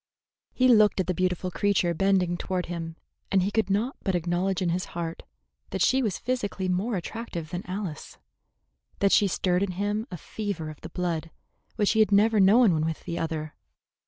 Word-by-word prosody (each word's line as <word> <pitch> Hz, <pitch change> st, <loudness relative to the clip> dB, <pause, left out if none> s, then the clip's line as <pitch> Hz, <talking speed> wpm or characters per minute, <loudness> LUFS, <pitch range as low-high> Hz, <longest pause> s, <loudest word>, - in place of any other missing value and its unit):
He 255 Hz, -, +3 dB
looked 215 Hz, -5 st, +5 dB
at 190 Hz, -, +1 dB
the 185 Hz, -, 0 dB
beautiful 180 Hz, 0 st, -1 dB
creature 195 Hz, -3 st, +1 dB
bending 185 Hz, -1 st, +2 dB
toward 180 Hz, +1 st, -2 dB
him, 165 Hz, -1 st, -5 dB, 0.4 s
and 190 Hz, -2 st, +3 dB
he 200 Hz, -, -1 dB
could 220 Hz, -1 st, +1 dB
not 220 Hz, +7 st, 0 dB
but 190 Hz, -3 st, -1 dB
acknowledge 175 Hz, +2 st, 0 dB
in 180 Hz, -3 st, 0 dB
his 180 Hz, +2 st, -1 dB
heart 165 Hz, -1 st, -4 dB, 0.5 s
that 190 Hz, -2 st, 0 dB
she 265 Hz, +2 st, +3 dB
was 210 Hz, -7 st, -1 dB
physically 205 Hz, -7 st, -2 dB
more 190 Hz, +6 st, 0 dB
attractive 175 Hz, -3 st, -5 dB
than 180 Hz, 0 st, -4 dB
Alice, 185 Hz, -6 st, -5 dB, 0.8 s
that 200 Hz, -1 st, +2 dB
she 205 Hz, -, +5 dB
stirred 180 Hz, 0 st, 0 dB
in 200 Hz, -2 st, -1 dB
him 205 Hz, +4 st, -2 dB
a 180 Hz, -, -6 dB
fever 185 Hz, -4 st, -5 dB
of 150 Hz, -, -14 dB
the 165 Hz, -, -8 dB
blood 170 Hz, -2 st, -2 dB, 0.5 s
which 205 Hz, -, +2 dB
he 220 Hz, -, +1 dB
had 215 Hz, -1 st, +4 dB
never 210 Hz, +2 st, +4 dB
known 205 Hz, +1 st, +6 dB
when 155 Hz, -1 st, 0 dB
with 160 Hz, 0 st, -3 dB
the 170 Hz, -1 st, -4 dB
other. 155 Hz, -2 st, -3 dB
185 Hz, 190 wpm, -26 LUFS, 175-205 Hz, 0.8 s, known